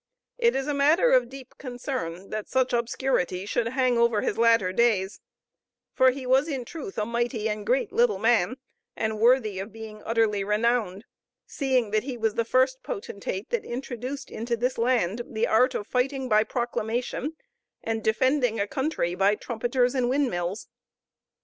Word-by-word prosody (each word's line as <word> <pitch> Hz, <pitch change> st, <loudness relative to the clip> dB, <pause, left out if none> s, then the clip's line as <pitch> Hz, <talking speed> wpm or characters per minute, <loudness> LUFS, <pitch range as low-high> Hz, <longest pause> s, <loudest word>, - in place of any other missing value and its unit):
It 470 Hz, -1 st, +3 dB
is 270 Hz, -, -1 dB
a 295 Hz, -, -1 dB
matter 310 Hz, -, +4 dB
of -, -, +4 dB
deep 265 Hz, -2 st, -12 dB
concern 245 Hz, -, -5 dB
that 215 Hz, -1 st, -4 dB
such 260 Hz, -1 st, +1 dB
obscurity 235 Hz, -6 st, 0 dB
should 225 Hz, +2 st, -1 dB
hang 250 Hz, -1 st, +1 dB
over 235 Hz, -3 st, +3 dB
his -, -, -1 dB
latter 230 Hz, -5 st, +3 dB
days; 210 Hz, -4 st, +1 dB, 0.7 s
for 260 Hz, -2 st, +5 dB
he 260 Hz, 0 st, -4 dB
was 265 Hz, +4 st, +3 dB
in 270 Hz, -6 st, -3 dB
truth 340 Hz, -, -8 dB
a 210 Hz, -, 0 dB
mighty 235 Hz, -1 st, -1 dB
and 210 Hz, -1 st, -3 dB
great 255 Hz, +8 st, +1 dB
little 470 Hz, 0 st, +3 dB
man, 230 Hz, 0 st, +2 dB, 0.4 s
and 220 Hz, -1 st, -2 dB
worthy 225 Hz, -4 st, +3 dB
of 200 Hz, +3 st, -6 dB
being 220 Hz, -1 st, -10 dB
utterly 225 Hz, -3 st, +1 dB
renowned, 210 Hz, -1 st, 0 dB, 0.4 s
seeing 255 Hz, -6 st, 0 dB
that 215 Hz, 0 st, +2 dB
he 255 Hz, 0 st, -5 dB
was 225 Hz, -2 st, 0 dB
the 230 Hz, -, 0 dB
first 260 Hz, +3 st, +2 dB
potentate 200 Hz, 0 st, -5 dB
that 475 Hz, -3 st, 0 dB
introduced 255 Hz, +2 st, -6 dB
into 235 Hz, +1 st, -2 dB
this 250 Hz, +2 st, -1 dB
land 235 Hz, -3 st, +1 dB
the 220 Hz, -1 st, -1 dB
art 255 Hz, +4 st, +3 dB
of 205 Hz, -, -3 dB
fighting 260 Hz, +3 st, -1 dB
by 215 Hz, -2 st, +4 dB
proclamation, 240 Hz, +4 st, -2 dB, 0.5 s
and 225 Hz, -1 st, -2 dB
defending 245 Hz, 0 st, +2 dB
a 200 Hz, -, +1 dB
country 265 Hz, -, -1 dB
by 195 Hz, +3 st, +3 dB
trumpeters 245 Hz, +3 st, 0 dB
and 250 Hz, -2 st, +1 dB
windmills. 215 Hz, -8 st, -1 dB
235 Hz, 165 wpm, -26 LUFS, 215-260 Hz, 0.7 s, for